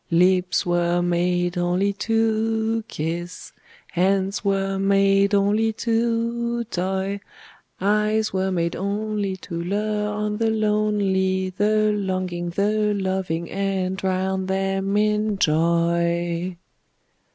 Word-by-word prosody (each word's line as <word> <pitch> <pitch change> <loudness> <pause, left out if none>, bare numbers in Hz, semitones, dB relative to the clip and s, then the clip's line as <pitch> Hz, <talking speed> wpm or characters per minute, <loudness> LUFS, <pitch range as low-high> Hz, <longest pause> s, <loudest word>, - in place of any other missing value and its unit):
Lips 180 +1 +3
were 175 0 +1
made 175 0 0
only 180 +3 +1
to 225 +1 0
kiss; 170 -1 -5 0.4
Hands 190 +3 +1
were 195 -1 0
made 195 +1 +3
only 210 +3 +2
to 235 +1 0
toy; 190 -1 -2 0.6
Eyes 210 +2 +1
were 190 0 0
made 170 -2 -1
only 205 0 -2
to 170 -2 -6
lure 210 +3 -1
on 210 0 -2
the 225 0 +1
lonely, 205 -3 +1
The 215 +2 +2
longing, 185 -4 -2
the 210 +3 +1
loving, 190 -4 -2
and 195 -1 -1
drown 190 0 -1
them 195 +1 0
in 210 0 +1
joy! 170 +1 +1
195 Hz, 105 wpm, -23 LUFS, 180-210 Hz, 0.6 s, Lips